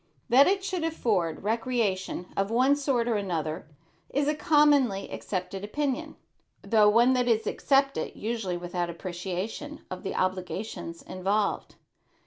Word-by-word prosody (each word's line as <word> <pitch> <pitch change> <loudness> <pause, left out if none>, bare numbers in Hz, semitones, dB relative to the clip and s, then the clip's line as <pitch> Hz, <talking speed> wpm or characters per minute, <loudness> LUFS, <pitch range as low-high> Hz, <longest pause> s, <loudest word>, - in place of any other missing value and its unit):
That 260 +4 +7
it 390 +1 +1
should 370 -3 -2
afford 210 - 0
recreation 215 -5 -1
of 195 0 0
one 255 +5 +4
sort 270 -5 0
or 230 -3 +1
another 165 -5 -3 0.4
is 285 +1 0
a 300 - +3
commonly 290 -9 +3
accepted 190 0 -4
opinion, 270 +5 -2 0.5
though 215 -2 +5
one 235 +4 +5
that 250 -1 +1
is 225 -2 +2
accepted 275 +4 +1
usually 215 -5 -3
without 175 0 -3
appreciation 185 - -5
of 185 - -5
the - - -4
obligations 185 -2 -3
involved. 200 +3 -1
220 Hz, 130 wpm, -27 LUFS, 185-270 Hz, 0.5 s, That